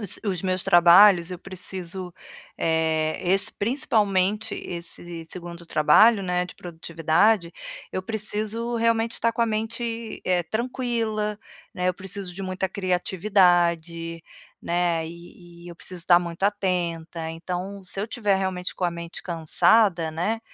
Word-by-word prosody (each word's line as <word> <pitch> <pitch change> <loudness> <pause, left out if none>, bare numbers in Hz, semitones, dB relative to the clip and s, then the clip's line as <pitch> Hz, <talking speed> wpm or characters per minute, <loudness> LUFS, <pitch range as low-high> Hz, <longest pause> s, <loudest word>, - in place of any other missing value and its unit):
os 205 -4 -5
os 185 -4 -2
meus 185 -1 -1
trabalhos, 175 0 +7
eu 180 - -5
preciso, 185 -1 -5 0.5
eh, 160 -1 +1
esse 190 +2 +3
principalmente, 210 -3 +1
esse 170 -1 -7
segundo 175 -1 -8
trabalho, 170 +8 +5
né, 180 -1 0
de 180 - -11
produtividade, 170 +3 +1 0.4
eu 185 - -3
preciso 220 +2 -2
realmente 230 0 +1
estar 230 0 0
com 230 - -4
a 230 - +4
mente, 225 +1 -3
eh, 180 -1 +2
tranquila, 220 0 -2 0.4
né, 180 0 0
eu 185 - 0
preciso 190 0 -5
de 195 - -6
muita 185 0 -2
criatividade, 175 -3 +1 0.4
né, 170 -2 0
e 170 +1 -12 0.2
e 175 - -9
eu 170 - -10
preciso 180 +1 -6
estar 175 +1 +5
muito 170 +1 -7
atenta. 170 -5 -1
Então, 180 +4 -5
se 185 - -5
eu - - 0
estiver 210 -3 0
realmente 185 -1 -3
com 185 - -3
a 175 - +2
mente 170 0 -7
cansada, 170 +1 +3
né, 180 +8 -2
185 Hz, 140 wpm, -24 LUFS, 170-210 Hz, 0.5 s, trabalhos